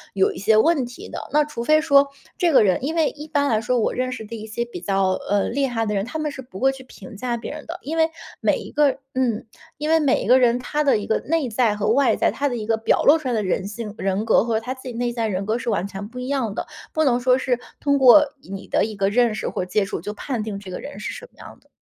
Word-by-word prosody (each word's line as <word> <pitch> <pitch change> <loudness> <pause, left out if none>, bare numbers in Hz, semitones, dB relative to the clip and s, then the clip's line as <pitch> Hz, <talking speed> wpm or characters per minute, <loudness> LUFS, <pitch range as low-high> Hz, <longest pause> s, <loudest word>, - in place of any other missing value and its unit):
有 190 - +2
一 - - -10
些 215 +3 +3
问 295 +1 +3
题 245 - -10
的。 - - -7
那 300 0 +3
除 295 -6 -5
非 310 +5 +4
说 280 -3 +4 0.3
这 350 -3 +2
个 275 - +6
人 190 +3 +2
因 310 +4 -1
为 320 -2 +2
一 300 +1 -10
般 285 -2 +1
来 220 -3 +1
说， 250 +2 0
我 220 - 0
认 255 0 -2
识 225 -3 -6
的 230 +2 -7
一 220 0 -7
些 235 +2 -3
比 240 - -9
较， 195 -1 +1 0.2
呃， 205 0 +2
厉 275 +3 0
害 230 -3 -1
的 210 -1 -1
人， 195 - 0
他 315 +6 -5
们 305 - -1
是 275 -2 -7
不 245 -7 -11
会 270 +1 +3
去 265 -1 -11
评 250 -2 -12
价 240 +3 -2
别 230 - -7
人 300 0 -8
的。 340 +2 -7
因 315 +4 -4
为 320 0 +3 0.3
每 - - +2
一 - - -9
个 290 -2 +2 0.2
嗯， 245 -4 0 0.3
因 300 +1 -3
为 325 0 +5
每 285 -4 +2
一 - - -5
个 255 +1 +6
人 245 -1 +3
他 300 +4 -1
的 275 -6 +3
一 205 - -5
个 220 - +1
内 320 -3 -1
在 220 -1 +1
和 210 0 -1
外 275 +3 +3
在， - - +2
他 285 0 -1
的 245 - -3
一 215 - -4
个 225 +1 +2
表 220 - +1
露 295 +3 +6
出 310 -4 -6
来 245 - 0
的 215 -2 0
人 185 +1 -1
性 210 0 -6
人 195 +2 -1
格 225 - +4
和 225 -2 0
他 250 +3 -4
自 260 - -15
己 245 - -6
内 240 0 -2
在 230 -2 -1
人 195 -1 -2
格 220 +2 0
是 235 - -3
完 195 -3 0
全 200 +1 -7
不 250 - -13
一 250 - -5
样 260 -7 -1
的， - - -3 0.3
不 315 - +2
能 245 -2 +3
说 250 +1 +3
是 255 -2 0 0.2
通 280 -1 +2
过 265 +4 +8 0.2
你 195 -3 -8
的 - - +2
一 215 -1 -6
个 195 0 +1
认 235 0 +2
识 - - -3
或 - - -3
接 195 +2 0
触 195 - -5
就 210 - -5
判 245 +1 -3
定 210 -2 -4
这 190 -2 -10
个 - - -5
人 200 - -8
是 - - -4
什 485 +1 -9
么 - - -31
样 - - -12
的。 - - -30
245 Hz, 325 characters per minute, -22 LUFS, 215-280 Hz, 0.3 s, 过